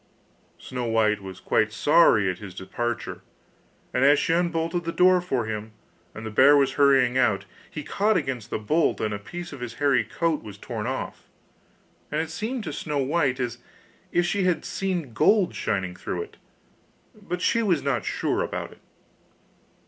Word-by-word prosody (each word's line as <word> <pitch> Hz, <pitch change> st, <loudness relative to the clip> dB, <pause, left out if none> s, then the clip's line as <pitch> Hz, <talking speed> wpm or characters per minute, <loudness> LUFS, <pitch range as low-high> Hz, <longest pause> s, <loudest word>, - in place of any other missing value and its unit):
Snow 125 Hz, -1 st, -5 dB
white 110 Hz, -2 st, +2 dB
was 95 Hz, -1 st, -9 dB
quite 110 Hz, 0 st, +1 dB
sorry 115 Hz, -, +4 dB
at 90 Hz, -1 st, -2 dB
his 100 Hz, -4 st, -9 dB
departure, 120 Hz, +5 st, -4 dB, 0.7 s
and 125 Hz, -, +2 dB
as 145 Hz, +1 st, +6 dB
she 180 Hz, -2 st, +1 dB
unbolted 170 Hz, 0 st, 0 dB
the 170 Hz, -, -2 dB
door 180 Hz, +1 st, +4 dB
for 130 Hz, -10 st, -1 dB
him, 110 Hz, 0 st, -5 dB, 0.4 s
and 110 Hz, -, -7 dB
the 110 Hz, -, -5 dB
bear 140 Hz, +7 st, +6 dB
was 135 Hz, -1 st, +3 dB
hurrying 135 Hz, -3 st, +4 dB
out, 100 Hz, -5 st, +2 dB, 0.2 s
he 155 Hz, -, -6 dB
caught 210 Hz, +5 st, +1 dB
against 130 Hz, -, -3 dB
the -, -, -2 dB
bolt 150 Hz, +10 st, +1 dB
and 105 Hz, -1 st, -1 dB
a 100 Hz, -, -4 dB
piece 175 Hz, +10 st, -8 dB
of 140 Hz, -, -8 dB
his 120 Hz, -1 st, -6 dB
hairy 140 Hz, -5 st, +2 dB
coat 150 Hz, +8 st, -1 dB
was 105 Hz, -2 st, -10 dB
torn -, -, -5 dB
off, -, -, -5 dB, 0.8 s
and 150 Hz, -, 0 dB
it 160 Hz, 0 st, -3 dB
seemed 225 Hz, +7 st, -3 dB
to 155 Hz, -, -5 dB
Snow 150 Hz, 0 st, -3 dB
white 140 Hz, -1 st, +1 dB
as 120 Hz, -1 st, -3 dB, 0.5 s
if 175 Hz, 0 st, +2 dB
she 195 Hz, +2 st, 0 dB
had 180 Hz, -2 st, +1 dB
seen 180 Hz, -10 st, -3 dB
gold 200 Hz, -, +3 dB
shining 95 Hz, -2 st, -2 dB
through 430 Hz, -, -4 dB
it, 430 Hz, +1 st, -15 dB, 0.8 s
but 200 Hz, -5 st, -5 dB
she 230 Hz, -, +2 dB
was 180 Hz, -9 st, +1 dB
not 135 Hz, -5 st, 0 dB
sure -, -, -1 dB
about -, -, -4 dB
it. -, -, -18 dB
140 Hz, 180 wpm, -25 LUFS, 110-170 Hz, 0.8 s, as